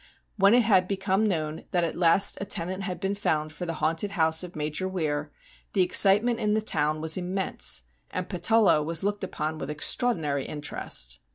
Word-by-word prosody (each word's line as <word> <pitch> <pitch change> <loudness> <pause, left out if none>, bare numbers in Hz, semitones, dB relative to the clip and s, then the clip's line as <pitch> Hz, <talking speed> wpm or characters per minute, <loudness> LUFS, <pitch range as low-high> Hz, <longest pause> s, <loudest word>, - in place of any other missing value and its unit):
When 200 +1 +5
it 245 - +4
had 190 -4 +3
become 195 +2 0
known 155 -5 -3
that 175 -1 0
at 165 - -2
last 175 +3 +4
a - - -2
tenant 185 -1 -1
had 185 -2 -5
been 195 0 -1
found 155 -6 -1
for 175 +4 -6
the 165 - -2
haunted 165 +7 -1
house 160 +1 +3
of 180 0 -9
Major 150 +4 -2
Weir, 155 -5 -3 0.4
the 190 - +3
excite 195 +3 +5
ment 240 -1 0
in 210 -2 +1
the 215 - +1
town 155 -6 +1
was 160 +1 +1
immense, 175 - -1 0.3
and 185 0 -4
Patullo 195 -1 +3
was 165 +2 -2
looked 205 0 -2
upon 155 -4 -4
with 135 - -6
extraordinary 150 - +1
interest. 60 - -4
180 Hz, 190 wpm, -26 LUFS, 155-195 Hz, 0.4 s, When